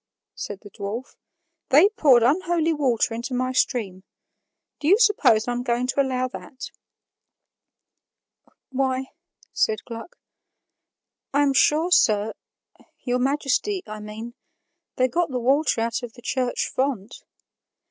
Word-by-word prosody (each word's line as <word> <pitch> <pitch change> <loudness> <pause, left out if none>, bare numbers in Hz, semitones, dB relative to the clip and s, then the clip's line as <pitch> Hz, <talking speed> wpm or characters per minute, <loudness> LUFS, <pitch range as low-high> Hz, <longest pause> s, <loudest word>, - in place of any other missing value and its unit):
said 200 -1 -7
the 205 - -13
dwarf; 210 +5 -6 0.5
"they 300 +8 +7
poured 270 - +4
unholy 330 +4 +2
water 255 -7 +1
into 240 +3 -4
my 255 +1 0
stream. 215 -7 -1 0.8
Do 295 - -3
you 390 +5 +6
suppose 405 - +3
I'm 245 0 -1
going 245 0 0
to 265 +2 +1
allow 255 -1 -1
that?" 260 +1 -9 2.0
"Why," 265 0 -1 0.4
said 215 -1 0
Gluck, 230 +6 -9 1.2
"I 290 - +4
am 280 -1 +2
sure, 305 +7 +3
sir, 215 -8 +3 0.7
your 250 -1 0
Majesty, 290 +8 0
I 215 0 -8
mean, 215 +3 -8 0.6
they 255 - +2
got 335 +5 0
the 255 -2 -2
water 270 0 +2
out 230 +1 -1
of 240 -2 -8
the 240 - -16
church 255 -2 -1
font." 255 -5 -3
255 Hz, 125 wpm, -24 LUFS, 230-285 Hz, 2.0 s, they